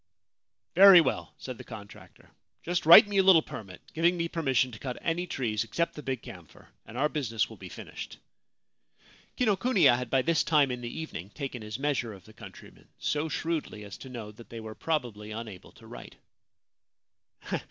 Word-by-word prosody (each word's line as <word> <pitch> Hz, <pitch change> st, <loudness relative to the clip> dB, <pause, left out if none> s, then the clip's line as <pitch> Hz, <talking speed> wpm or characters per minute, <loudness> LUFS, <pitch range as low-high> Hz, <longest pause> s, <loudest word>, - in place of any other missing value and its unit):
' -, -, -61 dB, 0.3 s
Very 190 Hz, 0 st, +10 dB
well/ 140 Hz, -6 st, -1 dB
said 130 Hz, -3 st, -8 dB
the -, -, -8 dB
contractor. 105 Hz, -3 st, -13 dB, 0.2 s
* -, -, -49 dB
Just 175 Hz, 0 st, -2 dB
write 195 Hz, +6 st, +10 dB
me 200 Hz, -1 st, +1 dB
a -, -, +5 dB
little 185 Hz, -4 st, +6 dB
permit, 95 Hz, -4 st, -9 dB
giving 170 Hz, +2 st, +2 dB
me 170 Hz, 0 st, -1 dB
permission 135 Hz, -7 st, 0 dB
to 110 Hz, -, -10 dB
cut 125 Hz, -2 st, -5 dB
any 175 Hz, +2 st, -2 dB
trees 110 Hz, -8 st, -1 dB
except 170 Hz, +10 st, -2 dB
the 150 Hz, -, -8 dB
big 130 Hz, -4 st, -4 dB
camphor, 85 Hz, -4 st, -13 dB, 0.2 s
and 115 Hz, -, -9 dB
our 145 Hz, +3 st, +2 dB
business 125 Hz, -8 st, -1 dB
will -, -, -11 dB
be -, -, -10 dB
finished.7 250 Hz, -, -10 dB
Kinokuniya 195 Hz, -, +4 dB
had 125 Hz, -, -5 dB
by 130 Hz, -1 st, +2 dB
this 165 Hz, -1 st, +2 dB
time 145 Hz, -5 st, +3 dB
in 125 Hz, 0 st, -5 dB
the 120 Hz, -, -5 dB
evening 120 Hz, -, -7 dB
taken 130 Hz, 0 st, -6 dB
his 105 Hz, 0 st, -6 dB
measure 135 Hz, -5 st, -1 dB
of 95 Hz, -, -14 dB
the 110 Hz, -, -16 dB
countrymen 110 Hz, -4 st, -14 dB
— -, -, -47 dB
so 150 Hz, +2 st, -1 dB
shrewdly 155 Hz, -10 st, -3 dB
as 100 Hz, -1 st, -9 dB
to 130 Hz, -, -10 dB
know 115 Hz, -4 st, -7 dB
that 115 Hz, +2 st, -15 dB
they 115 Hz, -, -8 dB
were 110 Hz, -1 st, -8 dB
probably 120 Hz, -9 st, -3 dB
unable 110 Hz, -4 st, -8 dB
to -, -, -17 dB
write. -, -, -11 dB
130 Hz, 195 wpm, -28 LUFS, 110-165 Hz, 0.3 s, Very